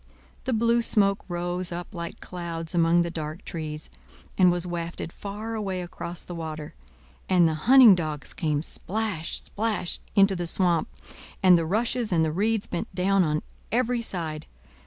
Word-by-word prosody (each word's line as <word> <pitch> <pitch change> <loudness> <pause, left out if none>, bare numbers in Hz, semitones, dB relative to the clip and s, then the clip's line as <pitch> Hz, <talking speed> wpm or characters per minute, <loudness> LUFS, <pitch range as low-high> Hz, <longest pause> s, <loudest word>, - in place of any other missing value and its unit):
The 260 - 0
blue 235 +1 +3
smoke 200 -3 +2
rose 175 0 -2
up 175 +3 -6
like 170 -2 -6
clouds 170 -2 -5
among 170 0 +4
the 170 - -3
dark 155 0 -6
trees, 155 -2 -4 0.5
and 180 -2 +5
was 175 0 -2
wafted 170 -1 -4
far 210 +3 -6
away 195 -4 -2
across 175 0 -6
the 175 - -8
water; 155 -2 -6 0.6
and 180 -3 +5
the 160 - 0 0.2
hunting 260 -5 +10
dogs 155 -5 -3
came—splash, 165 +4 -2
splash!—into 200 -2 +1
the 175 -1 -2
swamp, 170 -1 +2 0.6
and 185 -1 +8
the 165 -2 +1
rushes 230 +4 0
and 165 -2 +3
the 155 - 0
reeds 210 +5 +1
bent 170 - -5
down 195 +1 +3
on 155 -2 0 0.3
every 245 0 +1
side. 165 -8 -4
175 Hz, 155 wpm, -26 LUFS, 165-205 Hz, 0.6 s, hunting